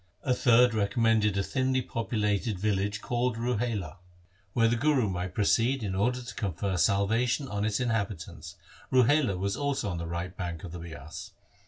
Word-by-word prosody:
A 130 - +2
third 125 -1 +5
recommended 105 0 +2
a 100 - +1
thinly 130 0 0
populated 105 -3 -1
village 105 +1 -1
called 120 -1 -1
Ruhela, 115 - -2 0.6
whither 115 -1 +3
the 120 - +2
Guru 130 -2 +2
might 90 -1 -4
proceed 115 +4 +2
in 100 -2 -2
order 125 +6 0
to 120 - -8
confer 95 0 -2
salvation 110 - +2
on 100 -3 -2
its 105 -1 0
inhabitants. 100 -8 -3 0.4
Ruhela 130 -4 +4
was 100 +2 -1
also 140 -7 -1
on 85 - -3
the 85 - -4
right 85 +2 -4
bank 85 -3 -5
of 90 - -7
the 90 - -7
Bias. 80 -3 -9
105 Hz, 165 wpm, -28 LUFS, 95-120 Hz, 0.6 s, third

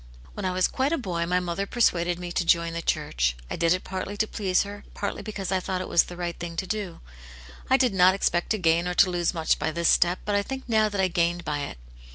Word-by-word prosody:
When - - -5
I 185 - +1
was 185 0 +2
quite 270 +2 -1
a 330 - +1
boy 175 - -2
my 180 +1 +2
mother, 180 +2 -3
persuaded 175 -7 +1
me 175 0 -6
to 175 - 0
join 170 0 +2
the 170 - -3
church; - - 0 0.2
I - - -1
did 165 0 +1
it 185 0 +1
partly 190 +2 -5
to 220 - +2
please 195 -4 0
her, 205 0 -9
partly 200 - -3
because 200 -4 -5
I 190 - +2
thought 185 0 -3
it 185 - -4
was 170 - +4
the 175 - -10
right 175 -1 -3
thing 170 -1 -6
to 190 - -2
do. 205 -3 -4 0.7
I 260 - +5
did 255 -5 +2
not 185 0 +5
expect 175 -3 0
to 220 - +1
gain 170 -1 +2
or 180 - -2
to 185 -1 +5
lose 175 0 0
much 160 -1 +1
by - - 0
this 170 +1 +1
step, 175 +1 +4
but 210 - -1
I 205 - +3
think 265 +6 -6
now 220 -2 +3
that 200 -1 -4
I 190 - +3
gained 175 0 0
by 150 -1 -2
it. - - -8
180 Hz, 265 wpm, -26 LUFS, 170-200 Hz, 0.7 s, I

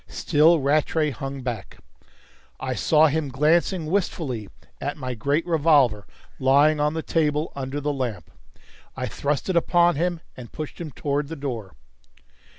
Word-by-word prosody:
Still 160 +3 +3
Rattray 150 +2 +1
hung 135 0 -6
back. 115 -6 -5 0.8
I - - -2
saw 155 0 +4
him 155 -1 0
glancing 160 +5 +2
wistfully 155 - -2 0.3
at 145 +3 -3
my 130 -3 -4
great 140 +8 0
revolver 145 - +3 0.3
lying 145 +3 +4
on 150 +1 +1
the 160 - -3
table 150 -1 0
under 135 +1 -4
the 145 0 -1
lamp. 120 - -4 0.7
I - - -2
thrust 140 -1 -2
it 190 - -1
upon 175 -1 +3
him, 175 0 -1
and 120 -3 -10
pushed 155 +2 -7
him 165 - -5
towards 145 0 -2
the 165 - -5
door. 120 - -5
145 Hz, 150 wpm, -24 LUFS, 135-160 Hz, 0.8 s, saw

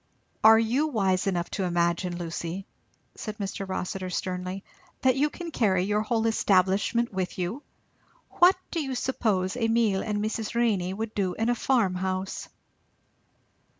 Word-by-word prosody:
"Are 220 +1 +9
you 240 +7 +2
wise 195 -9 +1
enough 175 -3 -1
to 195 - -2
imagine, 175 0 0
Lucy," 170 +2 -4 0.5
said 215 0 -6
Mr. 195 -1 -4
Rossitur 185 0 -3
sternly, 185 +1 -3 0.4
"that 260 -1 +4
you 290 +2 +2
can 340 +2 -7
carry 190 - +2
your 210 +2 +1
whole 225 +1 0
establishment 205 +2 +2
with 185 -2 -3
you? 185 +9 -3 0.8
What 360 +2 +7 0.2
do 335 - -1
you 270 -3 -3
suppose 215 -7 0
Emile 225 -4 +2
and 210 -1 -2
Mrs. 215 +1 -3
Renney 210 -7 +1
would 220 +3 -4
do 190 -3 -1
in 225 +1 0
a - - +4
farmhouse?" 190 -7 -1
200 Hz, 145 wpm, -27 LUFS, 185-230 Hz, 0.8 s, Are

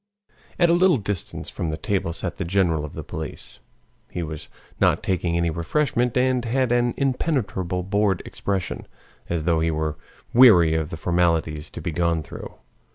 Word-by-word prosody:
At 170 -1 +4
a - - +5
little 180 -2 +5
distance 100 -4 -5
from 85 - -3
the 80 - -3
table 95 0 -1
sat 85 +1 -4
the 100 - -2
general 85 -3 +1
of 75 - -9
the - - -6
police. - - -7 0.5
He 85 - -4
was 75 -1 -7 0.3
not - - +3
taking 85 -2 0
any 85 -1 +1
refreshment, 120 - 0
and 125 -1 +2
had 125 +1 0
an 120 0 +2
impenetrable 110 - -1
bored 100 0 +1
expression, 95 -5 -3 0.4
as 85 -2 -1
though 85 -1 +2
he 80 +1 +1
were 80 -1 -2 0.4
weary 100 -10 +7
of 80 -1 -1
the 80 - -6
formalities 80 -3 0
to - - -8
be 85 - -3
gone 85 0 0
through. - - -9
90 Hz, 170 wpm, -23 LUFS, 80-120 Hz, 0.5 s, weary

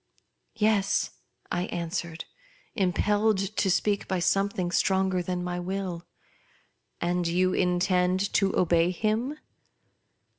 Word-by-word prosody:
" - - -49
Yes," 210 -3 +1 0.4
I 175 +1 0
answered, 170 -1 -4 0.5
impelled 205 +2 +2 0.2
to 195 - +1
speak 200 +2 +1
by 190 - 0
something 185 0 0
stronger 190 -1 +2
than 180 0 -3
my 180 0 -3
will. 180 -1 -4 0.4
" - - -39
And 175 0 0
you 185 +2 +2
intend 180 +1 +1
to 195 -2 +2
obey 170 -1 +3
him 220 - -1
185 Hz, 115 wpm, -27 LUFS, 175-195 Hz, 0.5 s, obey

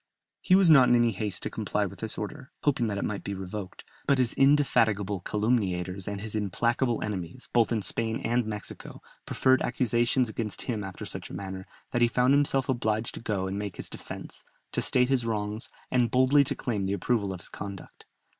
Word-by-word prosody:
He 185 - +4
was 190 -4 +6
not 135 -5 +7
in 120 - +6
any 120 -1 +4
haste 100 -2 -3
to - - -3
comply - - -1
with - - -8
this - - +2
order, - - -6
hoping 130 -5 +2
that 100 -2 -2
it - - -1
might 105 -2 -3
be 100 - -4
revoked, 95 +1 -7 0.2
but 140 - +4
his 125 -3 +2
indefatigable 110 -8 +3
calumniators 95 -3 -1
and 100 -1 -4
his 110 0 -6
implacable 115 +4 0
enemies, 95 +2 -5
both 120 -1 +3
in 110 -3 0
Spain 110 +4 0
and 120 +2 +1
Mexico, 105 -1 -7 0.2
preferred 130 0 +3
accusations 120 +1 +2
against 110 -2 -3
him 110 -5 -3
after 95 -1 -7
such - - -5
a - - -8
manner, 95 -1 -6 0.2
that 120 - 0
he 120 - +6
found 125 +3 +3
himself 140 -2 +2
obliged 110 -3 0
to - - -6
go 100 -4 -1
and 95 +1 -3
make 100 -3 -5
his - - -6
defence, - - -9 0.3
to - - 0
state 125 0 +4
his 130 -3 +2
wrongs, 110 +1 -3 0.2
and 125 -2 +3
boldly 130 +4 +5
to - - 0
claim 105 -6 -2
the 95 - 0
approval 100 0 0
of 90 -2 -7
his - - -11
conduct. 100 -1 -9
110 Hz, 200 wpm, -28 LUFS, 100-125 Hz, 0.3 s, not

